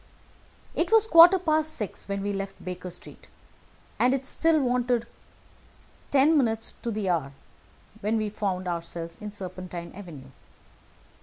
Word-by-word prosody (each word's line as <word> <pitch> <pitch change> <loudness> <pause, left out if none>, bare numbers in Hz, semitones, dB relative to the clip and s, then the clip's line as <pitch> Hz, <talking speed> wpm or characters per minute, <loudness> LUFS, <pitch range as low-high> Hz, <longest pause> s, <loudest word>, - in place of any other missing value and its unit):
It 340 +4 -1
was 445 -1 +6
a - - -14
quarter 340 +3 +9
past 315 -3 0
six 210 -4 -5
when 200 0 -3
we 205 0 -2
left 195 0 -6
Baker 180 0 -6
Street, - - -11 0.7
and 255 +2 +4
it 270 -1 -5
still 325 +3 +3
wanted 245 -2 +1 1.0
ten 285 +3 +4
minutes 225 -6 0
to 235 - -3
the 215 -3 -2
hour 155 -6 -1 0.7
when 220 +1 0
we 215 -1 -1
found 190 -3 -3
ourselves 170 -1 -4
in 210 0 -6
Serpentine 185 -3 -7
Avenue. 155 -9 -11
210 Hz, 145 wpm, -26 LUFS, 180-270 Hz, 1.0 s, quarter